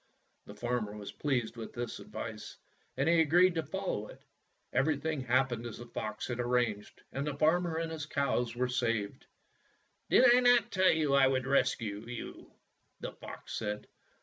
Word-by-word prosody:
The - - -10
farmer 120 -4 -2
was 100 -1 -7
pleased 125 -6 -1
with 115 - -7
this 120 -1 -4
advice, - - -7 0.4
and 140 +3 +1
he 170 0 +5
agreed 175 +4 +5
to 165 - 0
follow 160 - -3
it. - - -13 0.5
Everything 150 +1 +1
hap 130 +1 +2
pened 120 0 -4
as 115 - -8
the 120 - -9
fox 110 -2 -5
had 120 -1 -4
arranged, 120 -4 -1
and 140 +2 -3
the 145 - -2
farmer 165 +2 +2
and 165 0 -2
his 155 -2 -5
cows 125 -5 0
were 125 +1 0
saved. 115 -5 -2 0.8
"Did 255 - +6
I 250 - +6
not 245 -1 +4
tell 190 -1 +4
you 155 -3 +2
I 135 -1 +6
would 130 -1 0
rescue 115 -6 +1
you? 120 -1 -8 0.3
" - - -45
the - - -4
fox - - -10
said. 105 -1 -3
130 Hz, 175 wpm, -32 LUFS, 120-160 Hz, 0.8 s, Did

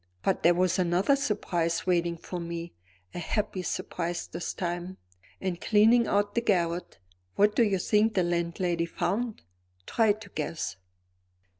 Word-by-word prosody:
But 190 - +1
there 175 +1 +5
was 185 +1 +2
another 180 +9 +3
surprise 175 -10 -1
waiting 170 -2 +1
for 180 +2 -6
me; 170 0 -5 0.4
a - - -4
happy 200 +1 -2
surprise 175 0 -3
this 170 +1 -5
time. 175 +1 -3 0.4
In 185 -2 -2
cleaning 225 +5 +4
out 205 0 +1
the 235 - +1
garret, 175 -5 0 0.4
what 210 +1 +4
do - - +4
you 205 -4 +3
think 210 +3 +2
the 185 - +3
landlady 170 0 0
found? 225 +6 -2 0.4
Try 220 -2 +3
to 215 -1 -12
guess." 155 - -4
180 Hz, 145 wpm, -28 LUFS, 170-210 Hz, 0.4 s, there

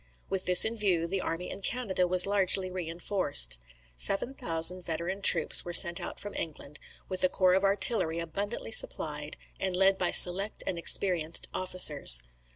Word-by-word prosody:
With 190 -1 -4
this 180 -1 +5
view, 205 -7 -2
the 185 +2 -5
army 165 +2 -7
in - - -11
Canada 195 -5 -3
was 180 0 +2
largely 190 -2 -1
reinforced. 165 - 0 0.4
Seven 195 - -3
thousand 170 -3 -3
veteran 170 +4 -7
troops - - +4
were 175 - -9
sent 170 -2 +4
out - - -9
from 205 0 -11
England, 150 -2 -9 0.3
with 185 -1 -5
a 185 - +1
corps 185 -1 -1
of 190 +1 -1
artillery 195 -4 +2
abundantly 200 +8 -8
supplied, 150 -7 -2 0.2
and 190 -1 -4
led 195 +1 0
by 180 - -2
select 195 +4 +4
and 175 - -6
experienced 170 -2 +1
officers. 150 - +5
185 Hz, 160 wpm, -26 LUFS, 165-195 Hz, 0.4 s, this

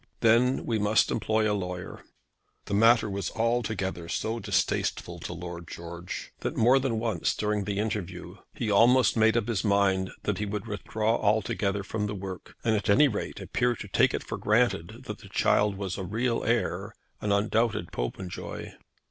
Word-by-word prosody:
Then 120 +3 +4
we 115 -2 0
must 105 +1 +3
employ 110 -1 +1
a 105 - +2
lawyer." 90 -3 -5 0.6
The - - -5
matter 115 +2 +5
was 100 -2 -3
altogether 110 -7 -1
so 115 +2 -2
distasteful 105 -2 -1
to - - -6
Lord 85 -1 -7
George, 85 +1 -7
that - - -3
more 125 +4 +5
than 130 -4 -1
once 115 0 0
during 105 -1 -1
the 100 0 -2
interview 95 -4 -3 0.2
he 120 -8 -1
almost 120 +3 +5
made 110 0 +4
up 115 - 0
his 110 -5 -1
mind 100 -2 +2
that 105 -2 -1
he 105 - -1
would 105 +2 -4
withdraw 110 +2 -1
altogether 100 -1 0
from 105 +1 -2
the 105 - -4
work, 95 -1 -7
and 110 -1 +2
at 100 -1 -2
any 145 +9 +6
rate 110 -6 -4
appear 125 -1 0
to 105 - -8
take 95 - +3
it - - -4
for - - -5
granted 105 -6 +1
that - - -7
the - - -13
child 105 -2 +2
was 95 -1 -4
a - - -3
real 115 +5 -1
heir, 120 0 -1 0.3
an 105 - -1
undoubted 110 +3 +1
Popenjoy. 90 +10 -5
105 Hz, 175 wpm, -28 LUFS, 95-115 Hz, 0.6 s, any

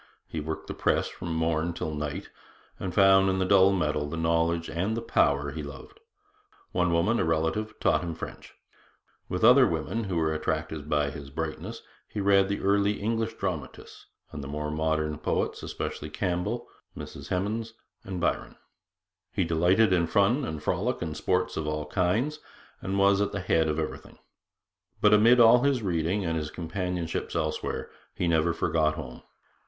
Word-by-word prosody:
He 80 - -4
worked 80 +1 -5
the - - -5
press - - +1
from 85 -2 -5
morn 80 +1 0
till 80 -2 -4
night, 75 -1 -4 0.5
and 95 - -3
found 95 0 +5
in 95 - +1
the 95 - +1
dull 95 0 +6
metal 75 -5 0
the 85 - -4
knowledge 80 0 +1
and 95 +7 -2
the - - -2
power 70 -8 +2
he 80 +2 -5
loved. 75 - -10 0.7
One 90 - +1
woman 90 +8 +2
a - - +2
relative 80 +7 -1
taught - - +2
him 85 -2 -4
French. - - -9 0.7
With 90 - -2
other 125 +2 +8
women, 85 +8 -2
who 95 -3 -3
were 80 -1 +1
attracted 80 -1 -3
by 75 -1 +1
his 70 -1 -9
brightness, 80 +2 -5 0.2
he 105 - -6
read 100 -1 +4
the 100 - -2
early 100 +1 +3
English 115 +1 -1
dramatists 90 -10 -6 0.2
and 75 -2 -6
the - - -6
more 75 +1 -3
modern 80 -1 -1
poets, - - -1
especially 75 - -5
Campbell, 90 +2 -2 0.3
Mrs - - -8
Hemans, 110 +5 -2 0.3
and 95 -2 -5
Byron. - - -1 0.8
He - - 0
delighted 90 +6 +3
in 85 -2 +2
fun 100 - +3
and 80 -6 -5
frolic 100 +9 -1
and 80 -2 -4
sports - - 0
of 80 - -2
all 75 0 -2
kinds, 105 - 0 0.4
and 95 +1 -2
was 100 0 +4
at 100 0 -1
the 100 - -2
head 80 -3 +2
of 75 0 -1
everything. 80 -1 -5 0.8
But 105 0 +5
amid 115 +4 +6
all 120 +1 +7
his 135 -4 +1
reading 90 +2 0
and 80 -1 0
his 75 -1 -3
companionships 90 0 -3
elsewhere, - - -2 0.2
he 90 - -1
never 85 0 +3
forgot 80 -2 +1
home. 65 -5 -8
85 Hz, 170 wpm, -27 LUFS, 80-100 Hz, 0.8 s, other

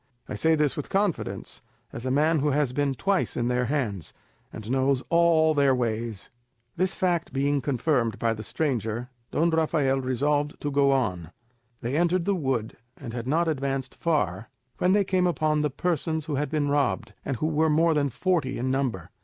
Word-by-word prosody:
I - - -5
say 160 +10 +2
this 150 -2 +1
with 150 - -5
confidence, 195 -3 -2 0.3
as 125 - -5
a - - 0
man 155 +4 +3
who 150 +2 +1
has 140 -3 +1
been 140 0 0
twice 195 +6 0
in 120 0 0
their 125 0 +1
hands, 115 - -2 0.4
and 110 +1 -7
knows 135 0 +1
all 165 -2 +4
their 140 -3 +3
ways." 115 -3 -3 0.4
This 185 +2 0
fact 175 -4 0
being 140 +1 +1
confirmed 125 -3 0
by 115 -1 +1
the 110 - -7
stranger, 120 -2 -2 0.2
Don 165 +2 +1
Rafael 150 -4 +1
resolved 145 +3 0
to 145 - -2
go 140 0 +3
on. 90 - 0 0.5
They 120 +4 -2
entered 175 +2 +2
the 200 - +2
wood, 130 - -2 0.2
and 120 -5 -8
had 120 0 -5
not 165 +5 +2
advanced 135 -3 -2
far, 110 - -1 0.3
when 180 +1 +3
they 205 0 +4
came 185 -1 +1
upon 155 -2 +1
the 150 - +1
persons 160 +1 -1
who 155 - -4
had 145 +2 -1
been 150 -2 0
robbed, 145 -1 0
and 135 - -3
who 150 - -2
were 160 0 +2
more 165 +2 +3
than 145 -2 +1
forty 150 -2 0
in 130 +2 -1
number. 130 -10 -2
145 Hz, 185 wpm, -26 LUFS, 125-160 Hz, 0.5 s, all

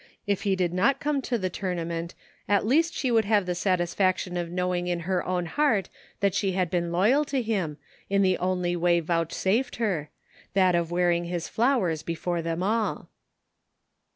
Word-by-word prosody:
If 200 -2 0
he 195 -2 +1
did 180 -2 0
not 270 +10 +2
come 290 -1 0
to 245 -2 -1
the 185 -4 -2
totunament 170 -2 -3 0.3
at 205 +1 +2
least 325 +8 +2
she 255 - 0
would 225 -2 +3
have 205 -2 +2
the 180 - -1
satisfaction 185 0 0
of 175 -1 -2
knowing 180 0 -1
in 175 -1 -1
her 185 +2 -1
own 180 -1 -1
heart 220 - +1 0.3
that 200 -2 +2
she 195 -2 0
had 180 -2 0
been 175 -1 0
loyal 215 +12 +3
to 275 -2 -1
him, 195 -11 -2 0.3
in 200 0 +3
the 185 -1 +2
only 180 -1 0
way 175 0 +3
vouchsafed 175 +9 0
her, 180 -10 -1 0.5
that 185 -2 +4
of 170 -1 +1
wearing 175 0 +1
his 170 -1 -3
flowers 225 - +1
before 170 +1 -2
them 165 +1 -3
ajl. 215 +3 -1
185 Hz, 180 wpm, -26 LUFS, 175-210 Hz, 0.5 s, that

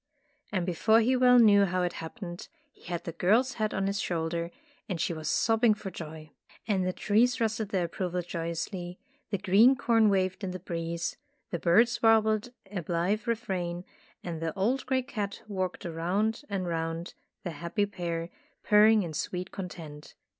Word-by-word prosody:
And 185 -4 0
before 220 +6 +3
he 245 +3 +3
well 250 0 +6
knew 205 -4 +7
how 185 -1 0
it 175 - -1
hap 160 +7 -8
pened, 175 -2 -6 0.2
he - - -22
had 175 -1 -4
the 170 - -4
girl's 220 +10 +2
head 215 - +1
on 195 - -1
his 200 +1 -1
shoulder 170 0 -2 0.4
and 180 -4 -2
she 175 - 0
was 155 -1 -4
sobbing 225 -1 +3
for 195 -2 -7
joy. 155 -2 -9 0.4
And 190 -4 +1
the - - +1
trees 225 +6 +2
rustled 220 -2 -1
their 185 -4 0
approval 180 +1 -3
joyously, 175 +2 -4 0.3
the 200 - -1
green 210 +7 +5
corn 225 -3 +3
waved 185 0 0
in 190 - -2
the 185 0 -5
breeze, 170 -1 -4 0.3
the 170 - -2
birds 235 +8 +3
warbled 220 0 +3 0.2
a 195 -4 -3
blithe 180 +7 -1
refrain, 185 -6 -2 0.4
and 165 -2 -5
the 165 -1 -2
old 235 +8 0
gray 260 -1 +1
cat 210 -6 -5
walked 185 -3 -3
round 185 - -1
and 195 -2 -2
round 165 0 -3 0.3
the 175 - -3
happy 170 +6 -1
pair, 170 -4 -4 0.3
purring 215 0 +6
in 165 -3 -5
sweet 180 +4 -4
content. 160 -6 -8
185 Hz, 175 wpm, -29 LUFS, 170-215 Hz, 0.4 s, knew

